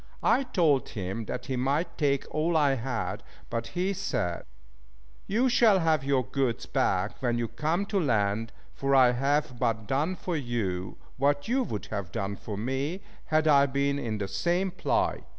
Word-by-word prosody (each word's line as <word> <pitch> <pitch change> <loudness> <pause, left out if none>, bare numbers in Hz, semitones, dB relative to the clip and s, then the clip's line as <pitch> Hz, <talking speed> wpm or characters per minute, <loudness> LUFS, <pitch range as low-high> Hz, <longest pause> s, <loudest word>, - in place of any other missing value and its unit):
I - - +4
told 165 - +2
him 100 +2 -4
that 125 - -5
he 130 - -2
might 145 +7 0
take 140 -3 +1
all 160 +2 +1
I 145 -3 +4
had, 125 -2 -3 0.3
but 115 0 -2
he 185 +2 +1
said 135 - -2 0.8
"You 235 +6 +2
shall 235 -5 +5
have 160 -5 +2
your 135 -2 +1
goods 130 0 -1
back 95 +7 0
when 120 -2 +1
we 120 -1 -1
come 160 - -1
to 200 -1 0
land, 110 - +1 0.2
for 135 0 +1
I 130 -2 +7
have 135 0 0
but 115 -3 0
done 150 - 0
for 180 -1 -3
you 110 - -2 0.2
what 145 +2 +1
you 260 +4 +2
would 105 - -4
have 100 -5 -4
done 100 +2 -3
for 105 0 -6
me, 135 - -2 0.2
had 155 0 +2
I 140 -2 +6
been 140 +1 0
in 110 -5 -2
the 100 -2 -3
same 180 - 0
plight." 180 - 0
135 Hz, 175 wpm, -28 LUFS, 115-160 Hz, 0.8 s, I